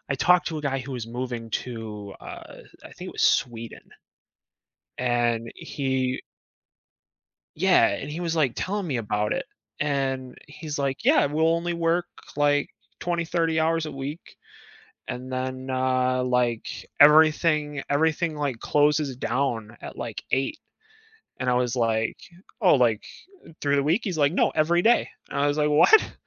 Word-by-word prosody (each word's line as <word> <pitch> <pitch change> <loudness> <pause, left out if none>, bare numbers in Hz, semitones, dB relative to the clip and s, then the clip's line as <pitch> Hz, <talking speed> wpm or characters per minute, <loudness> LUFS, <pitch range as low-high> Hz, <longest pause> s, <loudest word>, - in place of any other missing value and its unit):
I 135 - +2
talked 180 +6 +3
to 160 - -4
a - - -7
guy 135 -2 -1
who 130 +1 -7
was 120 -3 -5
moving 120 -1 -5
to, 110 -4 -7
uh, - - -10 0.2
I - - -11
think - - -7
it - - -13
was - - -2 0.2
Sweden. 115 -2 -8 1.2
And 120 -2 0
he 130 -2 -2 1.3
Yeah, - - +4
and 140 - -4
he 160 +3 -5
was, 170 -2 -2
like, 145 -6 +2
telling 200 0 -2
me 140 -6 -1
about 105 -2 -1
it, - - -2 0.4
and 135 -3 -1
he's 150 0 -7
like, 135 -1 -2
"Yeah, - - +5
we'll 155 +3 +1
only 170 +1 -1
work 170 +1 0 0.3
like 145 -1 +2 0.3
20, 170 -1 -1
30 165 -1 0
hours 160 0 +1
a 155 - -6
week, 140 +4 -7 0.7
and 130 +1 -6
then, 130 0 -4
uh, 130 0 +1
like, 125 -2 -1
everything 150 -1 +5
everything, 160 +2 +1
like, 140 -5 -2
closes 150 -2 +2
down 120 -3 -2
at - - -9
like - - -6
8." 135 - 0 0.8
And 130 - -1
I 125 - +3
was 125 0 0
like, 115 -2 0 0.4
"Oh, 185 -7 +5
like, 120 -5 +2 0.6
through 145 0 +1
the 140 - +2
week?" 165 +9 +2
He's 180 -6 -3
like, 145 0 +3
"No, - - +2
every 170 +3 +2
day." 235 +4 +4 0.2
And 140 - -3
I 140 - +2
was 145 0 +1
like, 150 0 +3
"What?" 410 - +5
140 Hz, 160 wpm, -25 LUFS, 125-155 Hz, 1.3 s, Yeah